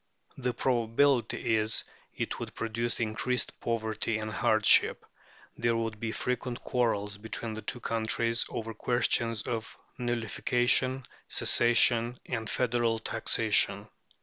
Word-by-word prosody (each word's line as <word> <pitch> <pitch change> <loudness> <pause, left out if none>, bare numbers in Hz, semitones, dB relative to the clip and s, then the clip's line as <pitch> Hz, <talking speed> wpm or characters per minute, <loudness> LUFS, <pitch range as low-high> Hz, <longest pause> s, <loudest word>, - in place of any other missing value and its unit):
182); 125 -2 -3
the - - -2
probability 120 -1 +2
is, 110 +1 +1 0.3
it - - -3
would - - -7
produce 115 +1 -2
increased 115 +3 -1
poverty 110 -1 -1
and 110 0 -4
hardship; 110 0 +3 0.5
there 115 0 +1
would 115 -2 -3
be 110 0 -2
frequent 125 0 -3
quarrels 105 -4 -1
between 110 +1 -4
the 110 - -5
two 120 - -3
countries 115 +1 0
over 115 0 -5
questions 115 -1 +1
of 115 -1 -4 0.2
nullification, 120 +2 +1 0.2
secession, 120 0 +4
and 110 -3 -3
federal 120 -2 +1
taxation 110 - +1
(p. - - -24
115 Hz, 120 wpm, -29 LUFS, 110-120 Hz, 0.5 s, secession